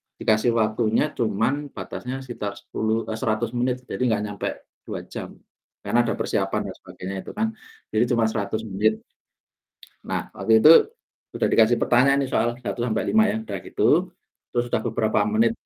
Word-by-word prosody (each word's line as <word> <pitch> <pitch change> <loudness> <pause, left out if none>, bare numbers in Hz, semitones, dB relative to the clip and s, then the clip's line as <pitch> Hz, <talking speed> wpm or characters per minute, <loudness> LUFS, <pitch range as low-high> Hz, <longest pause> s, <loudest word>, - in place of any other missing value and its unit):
dikasih 110 +2 +2
waktunya 110 +5 +1
cuma 115 0 0 0.2
batasnya 130 +1 -6
sekitar 105 -5 -5
sepuluh 110 +1 -2
eh, 110 - -4
100 115 -1 -1
menit 125 +1 -1
jadi - - -6
nggak 110 -5 +1
nyampe 105 -1 -4 0.4
2 - - -5
jam - - -8 0.5
karena 120 0 +2
ada - - 0
persiapan - - -1
dan - - -11
sebagainya 95 +2 -8
itu - - -8
kan. 220 +1 +1 0.4
Jadi 110 - +3
cuma 115 - +2
100 110 0 -2
menit. 110 +1 0 1.0
Nah, - - -3
waktu 110 0 +4
itu 150 +8 +8 0.7
udah - - +2
dikasih 115 +1 +5
pertanyaan 135 +3 +4
nih - - -9
soal, 115 - +3
1 125 -1 -5
sampai, 120 -2 0
5 220 0 +5
ya. 210 - -1
Udah 220 - -5
gitu, 175 +4 +2 0.4
terus 120 0 0
udah 115 - 0
beberapa 110 -1 +1
menit, 220 +1 +2
115 Hz, 165 wpm, -24 LUFS, 110-125 Hz, 1.0 s, itu